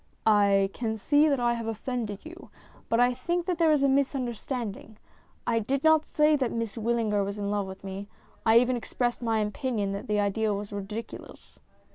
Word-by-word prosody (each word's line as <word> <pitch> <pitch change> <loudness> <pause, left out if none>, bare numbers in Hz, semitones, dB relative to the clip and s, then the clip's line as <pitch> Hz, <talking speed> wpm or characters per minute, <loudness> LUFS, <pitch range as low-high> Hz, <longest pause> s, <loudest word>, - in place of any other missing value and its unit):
" - - -41
I 200 -2 +4
can 220 -2 -3
see 290 +7 +3
that 280 -3 +1
I 240 -1 +2
have 230 -1 -4
offended 225 -1 -4
you, 345 +3 -11 0.4
but 230 - +2
I 245 0 +4
think 340 +7 -2
that 360 -2 -2
there 325 -2 +5
is 295 -2 +3
a - - +5
misunderstanding. 250 -5 -2 0.5
I 230 -1 +2
did 270 +5 -1
not 315 -1 +4
say 300 0 +3
that 260 -4 -1
Miss 230 -2 -3
Wyllinger 225 -3 0
was 200 +1 -4
in 200 -1 -2
love 205 -2 -1
with 190 0 -10
me; 195 +1 -6 0.4
I 225 0 +6
even 250 +1 +3
expressed 240 +1 -2
my 225 -2 +1
opinion 210 -2 -2
that 200 - -5
the 210 0 +1
idea 205 +1 +1
was 205 +1 -6
ridiculous." 205 +3 -8
230 Hz, 195 wpm, -27 LUFS, 205-260 Hz, 0.5 s, I